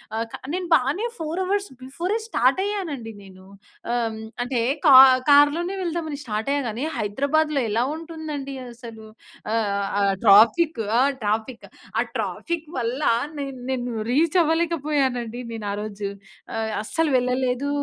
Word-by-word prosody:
ఆహ్, 225 +1 -1
కా - - -4 0.2
నేను 365 -1 -2
బానే 285 - 0
4:00 325 +2 -4
అవర్స్ 400 +2 -1
బిఫోరే 340 +11 -3
స్టార్ట్ 255 - +2
అయ్యానండి 325 - -4
నేను. 185 -1 -15 0.5
ఆహ్, 230 -2 -1 0.2
అంటే 245 0 -1 0.3
కా 280 - +8 0.4
కార్లోనే 295 +6 +4
వెళ్దాం 340 -2 -2
అని 285 - -4
స్టార్ట్ 220 +2 -3
అయ్యా 285 0 +1
కాని 225 +5 -4
హైదరాబాద్‌లో 280 +7 0
ఎలా 230 +3 +1
ఉంటుందండి 315 -4 -6 0.2
అసలు? 230 -2 -11 0.5
ఆహ్, 200 -3 0
ఆ! - - +2 0.2
ట్రాఫిక్ 230 - +5 0.2
ఆ! - - +5 0.2
ట్రాఫిక్ 220 +3 -2 0.3
ఆ - - +4 0.2
ట్రాఫిక్ 335 -2 -3
వల్ల 245 +5 -2 0.4
నేను 275 -2 -5
నేను 245 -2 -2 0.2
రీచ్ 315 +6 +2
అవ్వలేక 330 +1 +1
పోయానండి. 250 -5 -1
నేను 220 -2 -6
ఆరోజు 205 -1 -4 0.7
అస్సలు 325 +6 0
వెళ్ళలేదు 250 +2 0
265 Hz, 135 wpm, -23 LUFS, 230-320 Hz, 0.7 s, కా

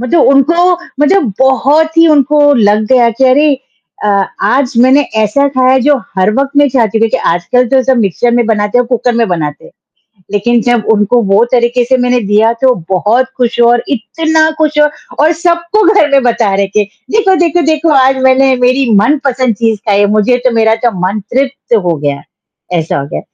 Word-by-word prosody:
मतलब 255 +7 0
उनको 335 +7 +2 0.3
मतलब 295 - +1
बहुत 285 +5 +1
ही 330 - +5
उनको 290 0 +2
लग 215 -3 +1
गया 240 -2 +3
कि 250 +4 -1
अरे! 290 +2 +2 0.5
अ, - - 0 0.3
आज 255 +6 0
मैंने 260 +3 +4 0.2
ऐसा 280 +7 0
खाया 260 +1 +3
जो 295 -1 +3 0.2
हर 185 - +2
वक़्त 275 +2 -1
में 290 0 +4
चाहती 225 -4 -1
थी, - - -1
आजकल 210 +9 0
तो 265 0 +2
सब 265 0 +1
मिक्सर 210 +4 -1
में 240 - +1
बनाते 210 +1 0
हैं - - +3
और - - -10
कुकर 245 0 -1
में 230 0 0
बनाते 150 -4 -4
हैं, - - -15 0.6
लेकिन 230 +4 0
जब 240 -2 -1
उनको 210 +3 +1
वो 200 +4 +4
तरीके 240 0 +1
से 260 +2 +1
मैंने 245 0 0
दिया 215 +2 +2
तो 260 -1 +3 0.2
बहुत 210 +7 +1
खुश 240 -1 -2
और 240 0 +1
इतना 315 +4 -1
खुश 305 -1 -1 0.4
और 310 +2 +3
सबको 340 +4 0
घर 305 -7 +2
में 275 -1 +3
बता 235 -4 0
रहे 200 0 -1
कि, 210 +2 -1 0.3
"देखो, 405 -3 +2
देखो, 345 +1 0
देखो 315 +1 0
आज 265 -1 +2
मैंने 260 0 +3
मेरी 255 +1 +1
मनपसंद 260 -4 -1
चीज़ 225 0 -1
खाई 200 -1 +2
है, 205 - +3
मुझे 245 +4 +1
तो 255 - +3
मेरा 220 0 +2
तो - - 0 0.2
मन 205 +3 -3
तृप्त 265 -2 -1
हो 170 -1 0
गया, 145 -1 -4 0.6
ऐसा 160 -2 -3
हो 140 - -6
गया - - -4
250 Hz, 195 wpm, -10 LUFS, 220-280 Hz, 0.6 s, ही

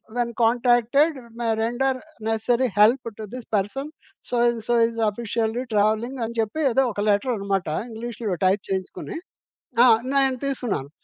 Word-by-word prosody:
When 240 -1 0
contacted 245 +6 +3 0.2
may 235 - -1
render 255 +4 0 0.3
necessary 235 +3 +1
help 235 +4 +5
to 220 - -6
this 250 -2 -7
person 210 +9 -2 0.4
so, - - -9
and 235 -1 0
so 240 - +2
is 230 0 -7
officially 225 +2 -2
travelling 220 +5 +1
అని 235 +1 -7
చెప్పి 225 +7 -1
ఏదో 270 +3 +3
ఒక 205 - -4
లెటరనమాట 200 -3 0 0.2
ఇంగ్లీష్‌లో 225 -3 -4
టైప్ 190 +2 +3
చేయించుకొని. 190 - -4 0.7
ఆ! - - +7 0.3
నేను 270 -2 +3
తీసుకున్నాను. 245 - -2
235 Hz, 140 wpm, -24 LUFS, 215-250 Hz, 0.7 s, ఆ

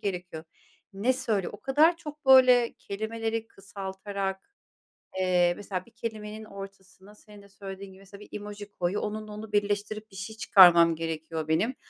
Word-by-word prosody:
gerekiyor. 180 -4 -5 0.5
Ne 205 +7 +1
söyle 225 -7 -1
O 205 - -11
kadar 305 +5 +4
çok, 300 -3 -10
böyle, 255 -2 +7
kelimeleri 225 +2 -4
kısaltarak, 195 -1 -5 0.8
eee, 180 -1 +3
mesela 190 -3 -5
bir 235 - -21
kelimenin 220 -2 -6
ortasına, 195 0 -12
senin 210 -1 -16
de 200 - -18
söylediğin 195 0 -9
gibi 190 - -16
mesela 200 +1 -14
bir - - -13
emoji 205 0 -9
koyuyor, 180 +1 -2
onunla 215 0 -5
onu 210 +1 -8
birleştirip 205 +1 -1
bir - - -15
şey 195 +3 -7
çıkarmam 170 -6 +7
gerekiyor 160 -1 -4
benim. 215 +11 +1
205 Hz, 150 wpm, -27 LUFS, 190-220 Hz, 0.8 s, böyle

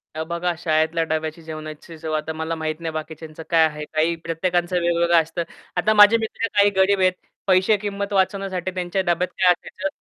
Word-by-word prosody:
अ, 160 - -2
बघा 170 +2 -2
शाळेतल्या 160 0 +1
डब्याची 160 0 -3
जेवणाची 155 +1 -8
चव 155 0 -5
आता 155 +1 -4
मला 160 +1 -3
माहीत 155 0 -3
नाही 165 -1 -4
बाकीच्यांचं 155 0 -7
काय 165 -1 +5
आहे? 150 -1 -7
काही 160 +2 0
प्रत्येकांचं 175 +2 -1
वेगवेगळं 170 0 +3
असतं. 165 +2 -4 0.3
आता 210 +5 +3
माझे 210 +2 +7
मित्र 225 0 -3
काही 200 0 +6
गरीब 190 +1 +3
आहेत. 185 -1 +3 0.3
पैसे 190 +3 +4
किमत 200 0 -4
वाचवण्यासाठी 190 -1 0
त्यांच्या 180 +1 -1
डब्यात 175 0 +1
काय 185 -1 +4
असायचं 190 +2 -3
170 Hz, 180 wpm, -22 LUFS, 160-190 Hz, 0.3 s, माझे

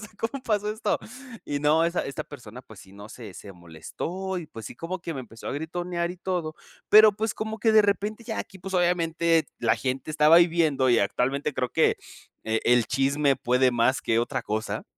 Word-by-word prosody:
sea, 210 - -9
¿cómo 255 +4 -4
pasó 210 -3 -1
esto?". 220 - -1 0.5
Y 145 0 -3
no, 155 +3 +3
esa 170 +1 -1
esta 140 - -5
persona, 125 -4 -11
pues, 110 -5 -15
sí, 95 - -16
¿no? 100 +1 -11
se 110 -5 -10
se 100 - -10
molestó, 160 - -6
y, 175 -3 -5
pues, 110 -2 -9
sí, - - -9
como 170 +7 -5
que 165 -1 -5
me 135 - -4
empezó 115 -2 -12
a - - -3
gritonear 170 +3 -3
y 180 - -8
todo, 175 -4 -3 0.3
pero, 215 0 +8
pues, 215 +2 -3
como 220 0 -5
que 225 - +3
de 220 -1 +6
repente 210 +3 -1
ya 220 -1 -4
aquí, 190 - -10
pues, 190 +1 -7
obviamente 170 -2 +2
la 115 - +2
gente 130 +3 -3
estaba 155 +2 +5
ahí 170 0 +6
viendo, 150 -6 +2
y 120 - +4
actualmente 135 +8 -1
creo 125 -1 -1
que, - - +2 0.5
eh, 110 0 0
el 120 -2 +4
chisme 135 +1 +1
puede 125 +1 +2
más 120 +2 +1
que 115 0 +1
otra 120 - -1
cosa. 110 +1 -3
155 Hz, 210 wpm, -26 LUFS, 125-180 Hz, 0.5 s, pero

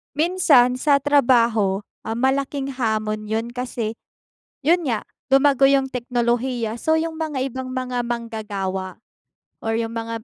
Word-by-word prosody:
Minsan 295 -7 +4
sa 290 +1 +4
trabaho, 235 -8 +3 0.2
ah, 225 - -2
malaking 270 +2 0
hamon 215 -4 -2
'yun 225 +2 -2
kasi, 240 -3 -4 0.6
'yun 335 +5 +2
nga 240 -8 -2 0.2
lumago 275 0 +5
yung 275 -1 +3
teknolohiya. 240 -2 -1
So 315 0 +3
yung 325 0 -2
mga 305 -5 -2
ibang 260 0 -5
mga 255 -1 -2
manggagawa 210 -6 -4 0.6
or 225 0 -2
yung 225 0 -2
mga 230 -1 -5
245 Hz, 130 wpm, -22 LUFS, 225-275 Hz, 0.6 s, lumago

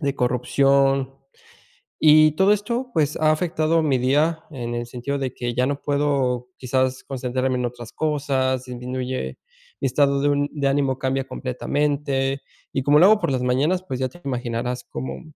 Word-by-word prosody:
de 140 -2 -1
corrupción. 135 +2 +2 0.9
Y 155 0 +7
todo 190 +3 +5
esto, 235 +5 -2
pues, 150 -2 +1
ha 155 -1 +3
afectado 160 -1 +1
mi 135 -4 +2
día 150 +6 +1
en 120 -5 -5
el 120 0 -3
sentido 125 +4 -4
de 130 -2 -3
que 120 -1 -3
ya 125 +1 +2
no 140 +1 -2
puedo 140 -4 0
quizás 130 0 -1
concentrarme 130 0 -2
en 125 - -2
otras 120 -1 -8
cosas, 135 -4 0
disminuye 125 +1 -4 0.4
mi 135 - 0
estado 140 +1 +2
de 145 - +2
un 145 0 +1
de 145 -2 -2
ánimo 135 -2 +1
cambia 135 0 0
completamente 135 +1 -1 0.3
y 135 - -1
como 145 +2 +4
lo 180 - +8
hago 215 0 +5
por - - 0
las 130 -1 -1
mañanas, 140 +9 +1
pues 130 -1 -4
ya 130 - 0
te 175 - -16
imaginarás 125 -1 -3
cómo 130 - -5
135 Hz, 170 wpm, -23 LUFS, 125-145 Hz, 0.9 s, lo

